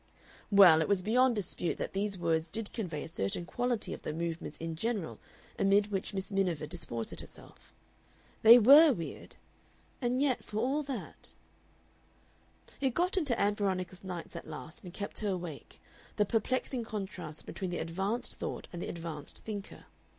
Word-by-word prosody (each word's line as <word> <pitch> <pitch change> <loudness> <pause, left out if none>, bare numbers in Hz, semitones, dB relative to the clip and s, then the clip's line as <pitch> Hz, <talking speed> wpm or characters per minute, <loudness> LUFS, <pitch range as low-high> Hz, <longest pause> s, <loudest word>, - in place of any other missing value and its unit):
Well, 185 -6 +8
it - - +1
was 195 -2 +2
beyond 245 +4 +4
dispute 180 -4 -2
that - - -4
these 200 0 -1
words 165 -2 +1
did 220 +3 -4
convey 170 -10 -3
a - - -7
certain 130 - -2
quality 240 +3 -1
of - - -8
the - - -4
Movements 165 -1 -4
in 165 0 -4
general 210 -1 -2 0.4
amid 200 +1 +3
which 195 -2 -2
Miss 195 0 -4
Miniver 180 -6 0
disported 145 -9 -4
herself. - - -14 0.7
They 230 +2 +10
WERE 280 +6 +9
weird. 170 -7 -7 0.7
And 245 +1 +1
yet 275 -3 +1
for 210 - -6
all 265 +7 +1
that 275 -3 -6 1.5
It 265 -3 +1
got 360 +3 +2
into 290 -11 +1
Ann 205 +1 +3
Veronica's 190 -2 -2
nights 180 -3 -6
at - - -7
last 160 +7 -9
and 180 - -8
kept 200 +3 -5
her 210 - -1
awake, 175 -6 -5 0.4
the 210 - +3
perplexing 245 +3 0
contrast 190 -8 -6
between 190 -2 -4
the 175 - -3
advanced 190 +8 -2
thought - - -5
and 175 - -5
the - - -4
advanced 165 -3 -7
thinker. 205 -2 -6
195 Hz, 165 wpm, -32 LUFS, 170-230 Hz, 1.5 s, They